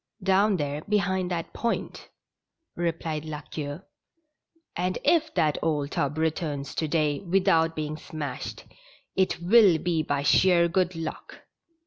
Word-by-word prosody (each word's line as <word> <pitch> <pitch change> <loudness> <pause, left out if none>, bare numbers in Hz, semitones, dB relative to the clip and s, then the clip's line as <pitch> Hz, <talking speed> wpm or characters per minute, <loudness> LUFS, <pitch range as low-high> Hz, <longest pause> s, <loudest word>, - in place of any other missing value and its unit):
"Down 195 +1 +3
there 145 -1 -3
behind 190 -3 +1
that 170 -2 -4
point," 235 -1 -3 0.7
replied 165 -2 -2
La 155 -1 -6
Queue. 145 +3 -6 0.5
" 330 +2 -44
And 180 +1 -1
if 320 -2 +3
that 150 -2 +2
old 150 -3 -1
tub 145 +1 -1
returns 155 -3 -2
to 160 - -1
day 150 -2 +1
without 170 -3 +2
being 155 0 -3
smashed, 150 -3 -6 0.5
it 190 -3 +1
will 190 0 +6
be 165 -1 0
by 145 -2 -1
sheer 175 +3 +4
good 180 +1 0
luck." 165 -1 -7
165 Hz, 135 wpm, -26 LUFS, 150-185 Hz, 0.7 s, will